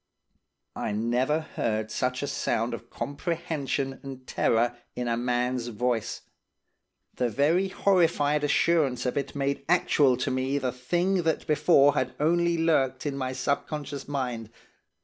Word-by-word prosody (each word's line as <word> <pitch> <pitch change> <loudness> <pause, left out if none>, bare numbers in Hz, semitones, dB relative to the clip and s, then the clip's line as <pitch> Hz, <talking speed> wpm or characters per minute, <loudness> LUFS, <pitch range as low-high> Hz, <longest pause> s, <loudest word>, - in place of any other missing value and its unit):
"I - - -2
never 125 +8 +1
heard 110 -7 -2
such 125 +2 -1
a - - -1
sound 115 -2 -1
of 115 0 -7
comprehension 145 -3 -3
and 135 -2 -9
terror 120 0 +1 0.2
in 125 -1 -3
a 115 - +1
man's 125 0 -1
voice. 120 0 -2 0.9
The 125 -1 0
very 155 - +2
horrified 165 -7 +2
assurance 145 -4 +2
of 125 - -1
it 140 0 -3
made 140 0 -1
actual 145 -7 +4
to 125 - -1
me 130 +2 0
the 130 -3 -1
thing 175 +9 0
that 160 -2 0
before 145 -2 +4
had 130 - -1
only 170 +2 +2
lurked 135 -6 +1
in 145 -2 -2
my 130 -1 -3
subconscious 140 +1 -3
mind. 125 -6 -3
135 Hz, 140 wpm, -27 LUFS, 125-150 Hz, 0.9 s, actual